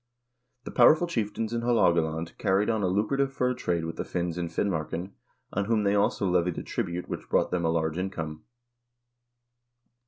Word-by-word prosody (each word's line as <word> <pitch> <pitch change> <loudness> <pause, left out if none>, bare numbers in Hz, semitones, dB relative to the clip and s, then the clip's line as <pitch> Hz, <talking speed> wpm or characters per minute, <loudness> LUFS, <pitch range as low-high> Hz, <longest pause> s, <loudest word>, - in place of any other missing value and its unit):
The - - -7
powerful 155 +7 +6
chieftains 115 -7 -2
in 115 - -1
Haalogaland 85 -9 +1
carried 100 +2 +2
on 110 -2 0
a 95 - +1
lucrative 110 +9 +1
fur 125 -1 0
trade 85 -8 -1
with 80 - -5
the - - -2
Finns 85 -1 -2
in 85 -1 -3
Fin 85 +5 0
marken, 85 +1 -3 0.4
on 100 +1 0
whom 110 -1 +1
they 100 0 +2
also 100 -1 +1
levied 90 -1 +1
a - - -4
tribute 85 +1 -3
which - - -6
brought - - +2
them 90 -1 0
a - - +2
large 80 0 0
income. 80 -5 -4
95 Hz, 180 wpm, -27 LUFS, 85-110 Hz, 0.4 s, powerful